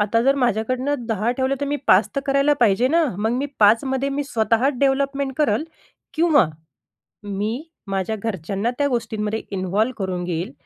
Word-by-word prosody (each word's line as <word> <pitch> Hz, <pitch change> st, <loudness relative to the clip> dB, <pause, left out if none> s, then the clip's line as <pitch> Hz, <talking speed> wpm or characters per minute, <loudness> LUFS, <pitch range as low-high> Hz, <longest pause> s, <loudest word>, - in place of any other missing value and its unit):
आता 210 Hz, +2 st, +2 dB
जर 275 Hz, +2 st, +4 dB
माझ्याकडून 250 Hz, +2 st, 0 dB, 0.2 s
10 220 Hz, +1 st, 0 dB
ठेवलं 260 Hz, +1 st, 0 dB
तर 285 Hz, -, -1 dB
मी 290 Hz, +1 st, -1 dB
5 190 Hz, +4 st, +5 dB
तर -, -, +2 dB
करायला 275 Hz, +2 st, +3 dB
पाहिजे 235 Hz, +3 st, +3 dB
ना 330 Hz, +2 st, +3 dB
मग 220 Hz, +2 st, 0 dB
मी 285 Hz, -, -1 dB
5 215 Hz, +5 st, +5 dB
मध्ये 265 Hz, +1 st, -1 dB
मी 280 Hz, +1 st, -2 dB
स्वतः 230 Hz, 0 st, +1 dB
डेव्हलपमेंट 275 Hz, 0 st, +1 dB
करेल 305 Hz, 0 st, +1 dB, 0.5 s
किंवा 315 Hz, -, +4 dB, 0.8 s
मी 205 Hz, +6 st, -3 dB, 0.3 s
माझ्या 195 Hz, +3 st, -1 dB
घरच्यांना 200 Hz, +2 st, -2 dB
त्या 285 Hz, -1 st, +2 dB
गोष्टींमध्ये 220 Hz, -3 st, -2 dB
इन्व्हॉल्व 195 Hz, +5 st, 0 dB
करून 185 Hz, -3 st, -3 dB
घेईल. 175 Hz, -3 st, -3 dB
235 Hz, 165 wpm, -22 LUFS, 205-275 Hz, 0.8 s, 5